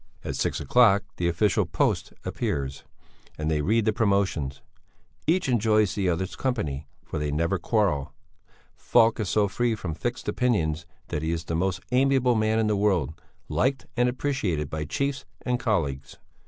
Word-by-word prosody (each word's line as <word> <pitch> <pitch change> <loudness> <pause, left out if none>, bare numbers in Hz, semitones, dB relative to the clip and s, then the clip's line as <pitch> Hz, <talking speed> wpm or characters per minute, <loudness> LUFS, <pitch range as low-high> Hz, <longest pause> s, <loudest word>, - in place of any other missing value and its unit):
At - - -3
six - - -1
o'clock 105 - +4
the 85 - 0
official 90 +4 +2
Post - - 0
appears, 70 -1 -3 0.5
and 75 +1 -1
they 75 -1 +1
read 110 +7 +2
the 110 - +2
promotions. 100 -10 0 0.7
Each 175 +1 +2
enjoys 110 -4 +3
the 100 -3 0
other's 90 +2 -2
company, 80 - -2 0.2
for - - -4
they 75 0 -1
never 85 +5 0
quarrel. 90 - +1 0.6
Falk 115 0 +3
is 105 -4 -1
so 105 -1 +3
free 120 +3 0
from 90 -6 -4
fixed 120 +9 -4
opinions 85 -10 0 0.2
that 75 - -2
he 80 +1 -1
is 85 -1 -2
the 85 - -3
most 90 +1 0
amiable 130 -1 +3
man 110 0 +2
in 110 - +2
the 105 -1 +2
world, 95 -8 +1 0.3
liked 130 0 0
and 125 0 +3
appreciated 115 - -1
by 75 0 -3
chiefs 140 - -2 0.2
and 125 -1 0
colleagues. 80 - -1
100 Hz, 165 wpm, -26 LUFS, 80-120 Hz, 0.7 s, o'clock